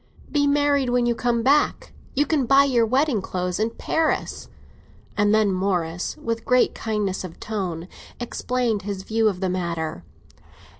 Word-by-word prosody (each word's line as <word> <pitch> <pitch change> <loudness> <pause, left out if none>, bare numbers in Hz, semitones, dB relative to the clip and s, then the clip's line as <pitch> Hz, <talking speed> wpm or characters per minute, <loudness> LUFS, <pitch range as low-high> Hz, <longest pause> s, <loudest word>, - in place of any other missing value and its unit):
"Be 290 -1 +2
married 285 -2 +2
when 245 0 +2
you 240 - +2
come 235 0 0
back. 285 +4 +2 0.2
You 290 +2 +3
can 290 -6 0
buy 275 +2 +6
your 245 -5 +2
wedding 260 -2 +2
clothes 180 0 -3
in 220 +1 +1
Paris." 320 +7 -1 0.7
And 205 0 +3
then 215 -2 +3
Morris, 180 -2 -1
with 230 -1 -3
great 250 +1 +3
kindness 210 -4 -2
of 180 -3 -9
tone, 180 -6 -4 0.3
explained 240 -2 -1
his 200 -2 -5
view 220 +1 +2
of 185 -2 -5
the 190 - +1
matter. 170 - -3
220 Hz, 155 wpm, -23 LUFS, 190-255 Hz, 0.7 s, buy